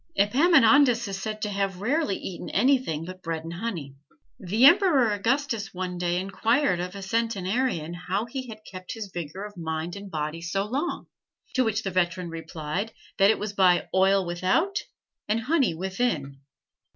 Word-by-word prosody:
Epaminondas 250 - +5
is 195 -1 -5
said 215 +1 -4
to 210 - -1
have 195 -2 -2
rarely 255 +1 0
eaten 185 -2 -6
anything 255 - +2
but 185 +1 -9
bread 165 -2 -3
and 165 +1 -6
honey. 170 -8 -4 0.5
The 215 +5 +3
Emperor 315 - +6
Augustus 225 -1 -1
one 180 -1 -4
day 175 0 0
inquired 195 +2 +1
of 180 +2 -4
a 200 - -7
centenarian 200 -4 -1
how 180 +4 -2
he 255 +2 -6
had 215 -2 -10
kept 185 -1 -8
his 210 -4 -7
vigor 175 +3 -5
of 210 0 -10
mind 160 0 -4
and 200 0 -8
body 155 0 -3
so 195 +4 -1
long; 275 +10 -2 0.5
to 260 - +3
which 220 -1 -1
the 195 - -2
veteran 180 -1 0
replied 165 +4 -4 0.3
that 195 +1 +6
it 220 - +3
was 210 -1 -4
by 185 -3 +3
"oil 190 0 +4
without 190 - +1 0.5
and 220 +2 +1
honey 270 - +2
within." 180 - -2
195 Hz, 165 wpm, -26 LUFS, 175-230 Hz, 0.5 s, Emperor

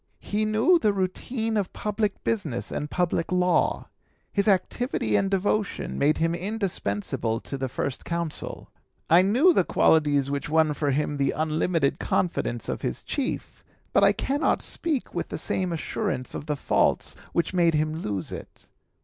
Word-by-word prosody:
He 215 +1 -1
knew 220 +12 +4
the 210 -8 +2
routine 220 +4 -2
of 200 -3 -2
public 210 -1 -2
business 165 - -2
and 150 - -3
public 175 -1 0
law. 180 0 +2 0.5
His 200 +1 +1
activity 195 - +1
and 195 - +2
devotion 200 +2 -1
made 150 +2 +3
him 165 +1 +1
indispensable 170 - -2
to - - -6
the 135 -1 -3
First 130 +1 -3
Consul. 170 -2 -4 0.4
I 170 +2 +8
knew 250 - +4
the 190 - +3
qualities 145 -5 +3
which 140 +1 -3
won 155 -1 +3
for 145 0 -1
him 145 +1 0
the 140 -1 +1
unlimited 155 -1 +1
confidence 120 -9 -1
of - - -3
his - - -3
chief, 275 -3 -4 0.3
but - - +5
I - - +7
cannot 285 +3 0
speak 310 -7 -1
with - - -2
the - - -5
same 185 -2 -1
assurance 170 - -3
of 150 - -6
the 150 -1 -1
faults - - +1 0.2
which 170 +1 0
made 170 -3 +3
him 155 +1 0
lose 100 - -3
it. - - -10
170 Hz, 160 wpm, -26 LUFS, 150-205 Hz, 0.5 s, I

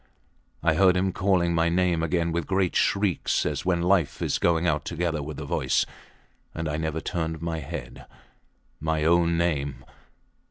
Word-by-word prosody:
I 80 -1 +4
heard 90 +2 +4
him 95 +1 +1
calling 90 -3 +2
my 85 0 +2
name 85 -1 +1
again 85 0 0
with 85 -1 -1
a - - -25
great 95 -2 +1
shriek, 100 -3 +1 0.2
as - - -2
when 85 -2 +1
life 90 -4 +2
is - - -1
going 85 0 +2
out 75 -3 +1
together 85 -2 -2
with 75 +1 -6
the - - -5
voice - - +1 0.7
and 80 0 -3
I 75 0 -2
never 80 0 -2
turned 80 -2 -3
my 80 0 -3
head. 70 - -8 0.7
My 80 -1 -1
own 85 +1 +3
name! 75 -5 -1
85 Hz, 170 wpm, -26 LUFS, 80-90 Hz, 0.7 s, I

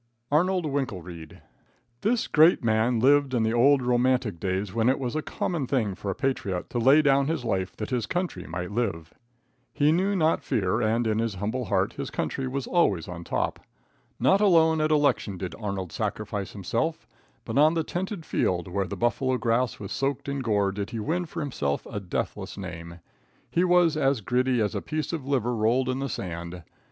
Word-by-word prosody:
Arnold 180 +3 +2
Winkelreid. 90 - -5 0.6
This 230 +2 +1
great 160 -1 +5
man 115 +1 +2
lived 140 +1 +4
in 115 - +2
the 110 +1 +1
old 130 +3 +4
romantic 125 -5 +1
days 95 +1 -2
when 115 +1 +2
it 130 - +2
was 125 -1 -3
a 155 - 0
common 155 -3 -3
thing 115 -8 0
for 100 +1 -6
a 95 - -2
patriot 115 -10 -2
to 120 - -1
lay 135 +6 +6
down 140 -1 +3
his 160 -6 -2
life 95 -3 -1
that 110 +4 -5
his 120 -4 -1
country 180 +5 -3
might 85 +3 -5
live. 100 -8 -2 0.6
He 145 +1 +3
knew 190 +5 +1
not 160 -3 +2
fear, 105 +2 0
and 115 +2 +1
in 110 -1 +1
his 115 -5 -2
noble 115 +5 -2
heart 95 -1 0
his - - -5
country 135 -1 -3
was 135 +1 -3
always 100 - +1
on 85 -1 -7
top. - - -2 0.6
Not 195 +2 +4
alone 160 -5 +4
at 155 - +2
election 145 -10 +2
did 90 -2 -5
Arnold 100 -5 -4
sacrifice 100 -2 -3
himself, 155 - -2 0.4
but - - 0
on 155 +3 +5
the 165 - +1
tented 180 0 -4
field, 90 -1 0
where 95 +1 -2
the - - -6
buffalo 130 +2 +1
grass 120 +1 0
was 100 - -7
soaked 135 +2 -2
in 140 0 -2
gore, 105 -6 +1
did 100 +1 -4
he 115 -2 -5
win 170 +10 -1
for 165 +1 -5
himself 75 - -2
a 105 - -5
deathless 95 0 -4
name. 85 -3 -8 0.5
He 175 - +2
was 175 -3 +4
as 135 -5 +1
gritty 125 +3 +1
as 105 -2 0
a - - -2
piece 155 +1 -3
of 145 -5 -4
liver 125 -3 0
rolled 120 +4 +1
in 130 +1 -1
the 135 0 -2
sand. 85 -3 -6
125 Hz, 195 wpm, -26 LUFS, 100-145 Hz, 0.6 s, lay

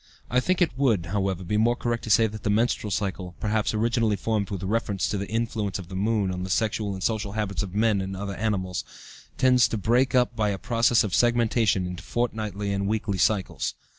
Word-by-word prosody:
I 125 - +4
think 185 +6 +2
it 150 -8 -2
would, 110 -11 +2
however, 95 0 -1
be 105 +4 -1
more 115 +3 +3
correct 120 -1 -2
to - - -6
say 110 +2 +5
that 110 0 -5
the - - -2
menstrual 110 0 +1
cycle, 95 -2 -3
perhaps 110 0 0
originally 115 0 +1
formed 105 0 -1
with 95 -2 -4
reference 100 -1 -1
to 105 - -1
the 100 - -5
influence 110 -3 -1
of 95 -3 -9
the 95 - -7
moon 100 -1 +1
on 90 0 -4
the 95 - -4
sexual 105 0 0
and 95 - -6
social 105 -3 -1
habits 105 -3 -2
of 100 -2 -6
men 105 -2 +2
and 95 0 -5
other 100 0 -4
animals, 95 -2 -2 0.5
tends 125 -2 +5
to 115 - -3
break 120 +5 +2
up 125 -1 +2
by 105 -1 +1
a 100 - -2
process 115 +3 +2
of 105 -4 -3
segmentation 115 -4 +2
into 90 +1 -6
fortnightly 105 -4 -2
and 100 0 -1
weekly 105 -2 -1
cycles. 100 +1 0
105 Hz, 215 wpm, -25 LUFS, 95-115 Hz, 0.5 s, say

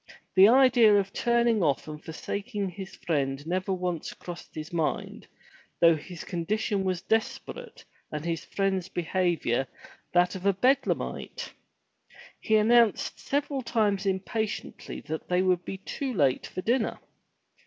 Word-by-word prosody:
The 190 +1 +8
idea 245 -3 +6
of 195 0 -3
turning 235 -2 +2
off 145 -4 +1
and 150 0 -8
forsaking 200 +5 -4
his 190 +1 -8
friend 140 -3 -1
never 185 +3 -1
once 180 -3 -2
crossed 175 -1 -10
his 155 +1 -7
mind, 165 -2 -2 0.5
though 165 -1 +6
his 165 +2 -8
condition 195 +3 -1
was 185 -1 -1
desperate, 225 - -3 0.3
and 150 +1 -4
his 165 -1 -2
friend's 190 -2 -1
behavior 170 -8 0 0.4
that 180 0 +3
of 190 +1 -3
a 200 - +5
Bedlamite. 255 +9 0 0.9
He 220 - +1
announced 225 0 +3
several 285 -1 -1
times 210 -5 0
impatiently 205 +3 -3
that 160 0 -6
they 180 +1 +2
would 180 -1 +2
be 195 - -5
too 265 +7 -4
late 135 -7 +2
for 185 - -6
dinner. 235 +2 +1
190 Hz, 135 wpm, -28 LUFS, 170-220 Hz, 0.9 s, The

